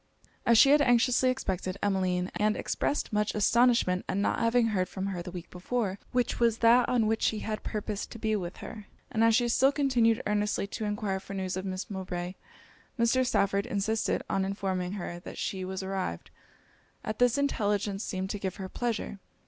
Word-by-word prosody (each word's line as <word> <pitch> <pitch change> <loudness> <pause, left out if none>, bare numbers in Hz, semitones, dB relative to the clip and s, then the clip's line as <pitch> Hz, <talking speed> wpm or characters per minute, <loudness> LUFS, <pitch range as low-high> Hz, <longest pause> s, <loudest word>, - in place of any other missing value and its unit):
As 235 - +6
she 275 +4 +7
had 295 0 +6
anxiously 250 0 +4
expected 190 -7 -2
Emmeline, 185 -2 0
and 210 0 +1
expressed 290 - -1
much 210 0 0
astonishment 230 -4 +3
at - - 0
not 200 - +1
having 230 0 +3
heard 185 -4 0
from 190 0 -4
her 190 -3 -3
the 175 - -7
week 180 -1 -8
before, 195 +1 -2
which 245 -1 0
was 230 -2 +3
that 235 +1 +5
on 240 -3 +2
which 220 +1 0
she 215 - +1
had 215 -1 -3
purposed 210 -1 -4
to - - -9
be 220 -1 0
with 180 -4 -4
her, 215 -3 -9 0.2
and 225 - +2
as 230 -1 +5
she 240 +1 +3
still 265 +3 +4
continued 245 -6 +2
earnestly 210 -1 0
to 210 +2 -5
enquire 205 -2 -2
for 195 +1 -8
news 190 -1 -2
of 185 +1 -4
Miss 185 0 -4
Mowbray, 185 -2 -4 0.6
Mr. 235 +2 +3
Stafford 200 -6 +1
insisted 215 +2 0
on 195 0 0
informing 190 -2 -2
her 175 -3 -5
she 190 -1 -3
was 190 +1 -4
arrived; 190 - -4 0.7
and 215 - -3
this 245 +1 +4
intelligence 205 -7 0
seemed 190 -1 -3
to 205 - -4
give 190 -2 -3
her 190 - -6
pleasure. 230 -3 -3
210 Hz, 190 wpm, -29 LUFS, 190-230 Hz, 0.7 s, she